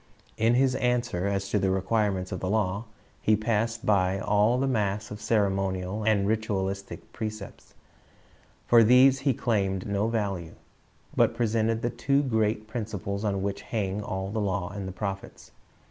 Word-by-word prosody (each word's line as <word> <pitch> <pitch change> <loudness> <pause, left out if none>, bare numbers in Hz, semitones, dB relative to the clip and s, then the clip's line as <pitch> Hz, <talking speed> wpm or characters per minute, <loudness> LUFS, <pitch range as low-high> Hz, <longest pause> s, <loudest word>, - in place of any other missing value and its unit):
In 115 +2 +2
his 130 0 +3
answer 120 -7 0
as 100 -1 -1
to 105 - +1
the 95 0 +1
requirements 95 0 0
of - - -3
the 90 - -3
law, 105 0 0 0.4
he 110 - +4
passed 115 +2 -1
by 95 -4 +2
all 105 +4 +2
the 135 - +1
mass 105 -4 -1
of 105 0 -7
ceremonial 95 -2 0
and 105 -2 +2
ritualistic 100 -3 -3
precepts. 110 -2 -7 0.9
For 120 -1 +6
these 130 +4 +6
he 135 -2 +1
claimed 95 -6 0
no 100 +1 0
value, 100 -7 -2 0.6
but - - +3
presented 115 0 0
the 120 - 0
two 140 +4 +1
great 110 -4 0
principles 105 -3 -4
on 100 -2 -1
which 100 0 -3
hang 105 -2 -2
all 95 -1 -4
the 110 0 -1
law 95 -1 -1
and 100 -1 -5
the - - -5
prophets. 95 0 -6
105 Hz, 160 wpm, -27 LUFS, 95-115 Hz, 0.9 s, For